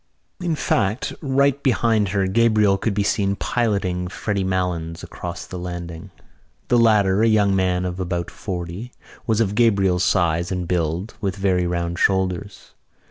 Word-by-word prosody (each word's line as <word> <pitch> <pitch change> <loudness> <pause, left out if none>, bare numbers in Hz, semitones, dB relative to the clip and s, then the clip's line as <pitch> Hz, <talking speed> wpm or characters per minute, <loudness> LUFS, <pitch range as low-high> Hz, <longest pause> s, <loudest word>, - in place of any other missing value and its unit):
In 175 -3 -1
fact 110 -5 0
right 140 -1 +2
behind 115 -6 +2
her 100 0 +1
Gabriel 105 -1 +3
could 110 -3 -1
be 100 - +1
seen 100 -1 +1
piloting 100 -7 -1
Freddy 100 +1 -2
Malins 90 -3 -2
across 85 -1 -7
the 90 - -7
landing. 85 -2 -6 0.6
The 120 - +4
latter, 105 -3 +4
a 115 - +4
young 105 -3 +3
man 90 -1 +1
of 90 0 -4
about 90 -1 -3
forty, 90 +5 -6 0.3
was 110 -2 +2
of 105 -3 +1
Gabriel's 100 -5 +3
size 85 -1 +1
and 90 -2 -2
build, 85 +4 -1
with 95 -3 -1
very 95 -3 +1
round 85 0 -2
shoulders. 95 0 -1
95 Hz, 150 wpm, -22 LUFS, 90-110 Hz, 0.6 s, The